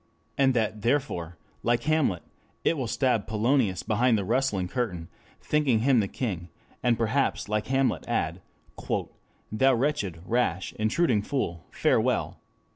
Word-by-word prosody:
And 135 Hz, -2 st, +3 dB
that 110 Hz, -2 st, 0 dB
therefore, 115 Hz, -, -1 dB, 0.2 s
like 120 Hz, 0 st, +1 dB
Hamlet, 150 Hz, -, +1 dB, 0.4 s
it -, -, +2 dB
will 130 Hz, -5 st, -2 dB
stab 120 Hz, -2 st, +1 dB
Polonius 110 Hz, -3 st, +1 dB
behind 115 Hz, +2 st, +2 dB
the 100 Hz, -, -2 dB
rustling 110 Hz, -5 st, 0 dB
curtain, 90 Hz, -7 st, -3 dB, 0.3 s
thinking 140 Hz, -7 st, +2 dB
him 130 Hz, 0 st, +4 dB
the 100 Hz, -, +1 dB
king, 95 Hz, -8 st, -4 dB, 0.3 s
and 120 Hz, -1 st, +2 dB
perhaps 115 Hz, +4 st, 0 dB
like 105 Hz, 0 st, -1 dB
Hamlet 135 Hz, 0 st, +1 dB
add: -, -, -1 dB, 1.1 s
"Thou 130 Hz, +4 st, +4 dB
wretched, 115 Hz, -, -1 dB
rash, 95 Hz, -7 st, 0 dB
intruding 110 Hz, +1 st, +2 dB
fool, 85 Hz, -, -3 dB
farewell! -, -, +1 dB
115 Hz, 130 wpm, -27 LUFS, 100-135 Hz, 1.1 s, him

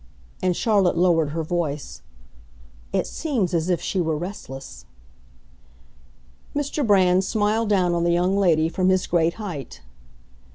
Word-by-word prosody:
And 180 Hz, -1 st, +1 dB
Charlotte 200 Hz, -5 st, +2 dB
lowered 170 Hz, -4 st, +3 dB
her 160 Hz, +2 st, -3 dB
voice. 150 Hz, -, -3 dB, 0.9 s
"It -, -, 0 dB
seems 235 Hz, -, -2 dB
as 170 Hz, +1 st, 0 dB
if 175 Hz, -, +1 dB
she 190 Hz, -, -1 dB
were 160 Hz, -2 st, -1 dB
restless." 135 Hz, -, -8 dB, 1.7 s
Mr. 290 Hz, +1 st, -2 dB
Brand 190 Hz, -4 st, +4 dB
smiled 215 Hz, +2 st, 0 dB
down 185 Hz, -4 st, +2 dB
on 170 Hz, 0 st, 0 dB
the 170 Hz, -, +2 dB
young 180 Hz, +3 st, +2 dB
lady 165 Hz, -5 st, +3 dB
from 185 Hz, +2 st, 0 dB
his 185 Hz, -1 st, +2 dB
great 170 Hz, -1 st, +1 dB
height. 140 Hz, -, -7 dB
180 Hz, 135 wpm, -23 LUFS, 160-195 Hz, 1.7 s, Brand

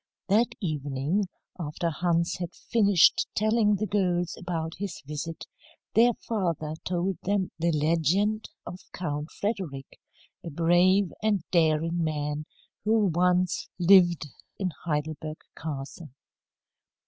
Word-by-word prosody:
That 230 Hz, +4 st, +3 dB
evening, 150 Hz, -, -1 dB, 0.3 s
after 165 Hz, +1 st, -2 dB
Hans 170 Hz, +1 st, 0 dB
had 175 Hz, -1 st, -5 dB
finished 205 Hz, -6 st, +4 dB
telling 215 Hz, 0 st, +3 dB
the 210 Hz, +2 st, -1 dB
girls 180 Hz, -4 st, 0 dB
about 165 Hz, -2 st, -4 dB
his 200 Hz, -4 st, -4 dB
visit, 150 Hz, +3 st, -5 dB, 0.5 s
their 240 Hz, +2 st, +5 dB
father 170 Hz, -8 st, -1 dB
told 180 Hz, +1 st, -1 dB
them 195 Hz, -1 st, 0 dB
the 170 Hz, +1 st, +2 dB
legend 170 Hz, +8 st, +1 dB, 0.2 s
of 180 Hz, -, -7 dB
Count 150 Hz, -3 st, -3 dB
Frederick, 180 Hz, -11 st, -4 dB, 0.4 s
a -, -, -5 dB
brave 175 Hz, +4 st, +3 dB
and 210 Hz, -5 st, +1 dB
daring 165 Hz, 0 st, +2 dB
man 150 Hz, -1 st, -2 dB, 0.4 s
who 215 Hz, -2 st, +3 dB
once 180 Hz, +1 st, +1 dB
lived 175 Hz, -3 st, +5 dB, 0.3 s
in 185 Hz, -2 st, -1 dB
Heidelberg 155 Hz, 0 st, -3 dB, 0.2 s
Castle. 150 Hz, +1 st, -6 dB
175 Hz, 110 wpm, -27 LUFS, 155-195 Hz, 0.5 s, their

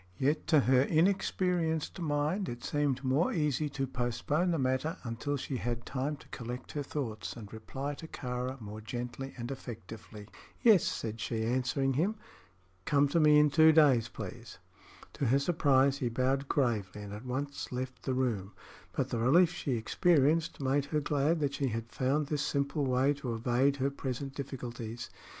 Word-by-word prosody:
Yet 145 Hz, +4 st, 0 dB
to 155 Hz, -4 st, +5 dB
her 130 Hz, 0 st, +4 dB
inexperienced 175 Hz, 0 st, +1 dB
mind 155 Hz, +4 st, 0 dB
it 120 Hz, 0 st, -7 dB
seemed 140 Hz, -3 st, 0 dB
more 135 Hz, +6 st, +2 dB
easy 150 Hz, -2 st, 0 dB
to 135 Hz, -1 st, -2 dB
postpone 130 Hz, +7 st, -1 dB
the 170 Hz, -, +1 dB
matter 130 Hz, +5 st, 0 dB
until 125 Hz, +4 st, -2 dB
she 135 Hz, 0 st, -4 dB
had 120 Hz, 0 st, -3 dB
time 140 Hz, +3 st, -2 dB
to -, -, -17 dB
collect 125 Hz, 0 st, -6 dB
her 145 Hz, -, -3 dB
thoughts 125 Hz, -7 st, -4 dB
and 110 Hz, -3 st, -10 dB
reply 135 Hz, +6 st, -5 dB
to 160 Hz, +3 st, -9 dB
Kāra 125 Hz, -1 st, -4 dB
more 105 Hz, -1 st, -8 dB
gently 125 Hz, +4 st, -5 dB
and 120 Hz, +1 st, -5 dB
effectively. 110 Hz, -4 st, -9 dB, 0.4 s
"Yes," 220 Hz, -8 st, +7 dB
said 110 Hz, 0 st, -3 dB
she, 110 Hz, -2 st, -2 dB
answering 130 Hz, +3 st, +1 dB
him; 180 Hz, +11 st, +1 dB, 0.7 s
"come 145 Hz, +4 st, +3 dB
to 165 Hz, -, +2 dB
me 150 Hz, -1 st, +6 dB
in 150 Hz, -1 st, +5 dB
two 160 Hz, +1 st, +7 dB
days, 140 Hz, -7 st, +5 dB
please." -, -, -8 dB, 0.6 s
To 140 Hz, -, -2 dB
her 130 Hz, +4 st, +4 dB
surprise 140 Hz, -3 st, +3 dB
he 125 Hz, -5 st, 0 dB
bowed 130 Hz, +3 st, 0 dB
gravely 105 Hz, -7 st, 0 dB
and 100 Hz, 0 st, -7 dB
at 105 Hz, +3 st, -7 dB
once 140 Hz, +3 st, -4 dB
left 130 Hz, 0 st, -4 dB
the 130 Hz, -, -1 dB
room; 110 Hz, -7 st, -1 dB, 0.4 s
but -, -, -1 dB
the 115 Hz, -, -1 dB
relief 165 Hz, +9 st, +5 dB
she 140 Hz, -, -2 dB
experienced 155 Hz, +6 st, +2 dB
made 135 Hz, +1 st, +1 dB
her 150 Hz, +1 st, 0 dB
glad 150 Hz, +3 st, +1 dB
that 140 Hz, -1 st, 0 dB
she 140 Hz, -, 0 dB
had 115 Hz, 0 st, -4 dB
found 140 Hz, +4 st, +1 dB
this 150 Hz, 0 st, -1 dB
simple 140 Hz, 0 st, 0 dB
way 130 Hz, +3 st, +3 dB
to 130 Hz, -5 st, -4 dB
evade 125 Hz, +4 st, +2 dB
her 140 Hz, 0 st, 0 dB
present 135 Hz, 0 st, -4 dB
difficulties. 120 Hz, -4 st, -6 dB
135 Hz, 170 wpm, -31 LUFS, 120-150 Hz, 0.7 s, Yes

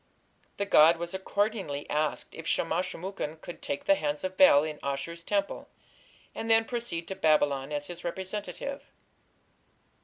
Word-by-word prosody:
The 200 Hz, -, 0 dB
god 165 Hz, -3 st, +6 dB
was 170 Hz, +1 st, -5 dB
accordingly 190 Hz, -6 st, -2 dB
asked 150 Hz, 0 st, -1 dB
if 165 Hz, 0 st, -8 dB
Shamash 170 Hz, +2 st, 0 dB
shum 180 Hz, -, -9 dB
ukin 185 Hz, -5 st, -4 dB
could 175 Hz, -, -9 dB
"take 140 Hz, -, -4 dB
the 195 Hz, -, +6 dB
hands 150 Hz, -4 st, -2 dB
of 185 Hz, 0 st, -3 dB
Bel" 170 Hz, -, +7 dB
in 155 Hz, -1 st, -5 dB
Ashur's 140 Hz, +5 st, -4 dB
temple, 200 Hz, +2 st, -2 dB, 0.6 s
and 225 Hz, -, -5 dB
then 225 Hz, 0 st, +5 dB
proceed 230 Hz, -9 st, -3 dB
to 190 Hz, -, -3 dB
Babylon 145 Hz, -4 st, +2 dB
as 145 Hz, -1 st, -2 dB
his 175 Hz, +1 st, -8 dB
representative. 200 Hz, +9 st, -4 dB
170 Hz, 155 wpm, -29 LUFS, 150-200 Hz, 0.6 s, Bel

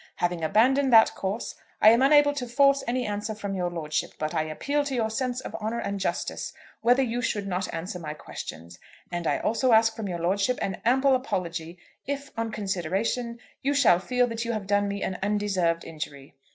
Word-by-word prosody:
Having 175 Hz, -1 st, -1 dB
abandoned 260 Hz, -, +3 dB
that 225 Hz, -1 st, +7 dB
course, 195 Hz, +4 st, -3 dB, 0.3 s
I 215 Hz, -, +8 dB
am 235 Hz, +2 st, +4 dB
unable 290 Hz, +1 st, +5 dB
to 260 Hz, -4 st, -4 dB
force 275 Hz, +2 st, +4 dB
any 250 Hz, +1 st, 0 dB
answer 210 Hz, +1 st, -3 dB
from 200 Hz, -2 st, -4 dB
your 180 Hz, -2 st, -1 dB
lordship. 155 Hz, -3 st, -3 dB
But 155 Hz, 0 st, -3 dB
I -, -, +1 dB
appeal 280 Hz, -, -1 dB
to 275 Hz, -2 st, -2 dB
your 220 Hz, -2 st, 0 dB
sense 250 Hz, +2 st, -2 dB
of -, -, -8 dB
honour 220 Hz, +2 st, -3 dB
and 200 Hz, -3 st, -3 dB
justice -, -, -3 dB, 0.3 s
whether 245 Hz, +3 st, +4 dB
you 240 Hz, 0 st, -2 dB
should 210 Hz, -5 st, -1 dB
not 185 Hz, -1 st, -2 dB
answer 175 Hz, +2 st, -5 dB
my 155 Hz, -2 st, -6 dB
questions; 85 Hz, -, -9 dB, 0.3 s
and 175 Hz, -1 st, -2 dB
I -, -, +2 dB
also 230 Hz, +2 st, +1 dB
ask 225 Hz, 0 st, +5 dB
from 220 Hz, -3 st, -4 dB
your 175 Hz, -2 st, -3 dB
lordship 195 Hz, +8 st, +1 dB
an 190 Hz, -2 st, -3 dB
ample 265 Hz, +3 st, +4 dB
apology, 175 Hz, -, -2 dB, 0.3 s
if, 280 Hz, 0 st, -4 dB
on 230 Hz, 0 st, -2 dB
consideration, 210 Hz, +4 st, -2 dB, 0.2 s
you 285 Hz, +2 st, 0 dB
shall 235 Hz, -11 st, +5 dB
feel 250 Hz, +6 st, +1 dB
that 230 Hz, -1 st, -3 dB
you 235 Hz, 0 st, -2 dB
have 215 Hz, -3 st, -3 dB
done 205 Hz, +1 st, +2 dB
me 200 Hz, 0 st, -3 dB
an 185 Hz, -, -3 dB
undeserved 195 Hz, -5 st, 0 dB
injury. 145 Hz, -3 st, -7 dB
215 Hz, 200 wpm, -26 LUFS, 180-245 Hz, 0.3 s, I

